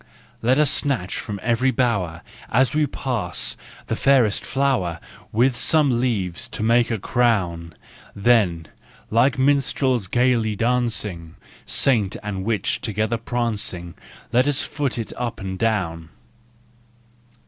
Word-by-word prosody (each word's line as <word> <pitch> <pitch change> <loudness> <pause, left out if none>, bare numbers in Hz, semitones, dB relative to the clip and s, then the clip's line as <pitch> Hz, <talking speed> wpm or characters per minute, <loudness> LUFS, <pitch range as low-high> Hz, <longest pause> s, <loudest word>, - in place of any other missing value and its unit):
Let 125 +4 +3
us 150 -2 +4
snatch 130 -12 0
from 100 -1 -5
every 120 +3 +2
bower, 100 -11 -1 0.3
As 130 +4 +2
we 150 -1 +2
pass, 120 -10 -3 0.3
the - - -2
fairest 130 -6 +3
flower, 125 -12 0 0.3
With 120 +3 +2
some 140 -1 +2
leaves 100 -9 -2
to - - -4
make 115 +1 +3
a 115 - -1
crown; 95 -8 0 0.4
Then, 100 -7 +2 0.4
like 125 +5 +3
minstrels 130 -4 +1
gaily 120 -1 +1
dancing, 105 -8 -1 0.3
Saint 110 -8 +2
and 100 -2 -4
witch 110 0 -1
together 110 0 -1
prancing, 110 -7 -2 0.4
Let 125 +3 +3
us 145 -1 +2
foot 140 -5 -3
it 115 - -4
up 120 -2 -3
and 95 -2 -5
down. 90 -8 -1
115 Hz, 125 wpm, -22 LUFS, 100-130 Hz, 0.4 s, us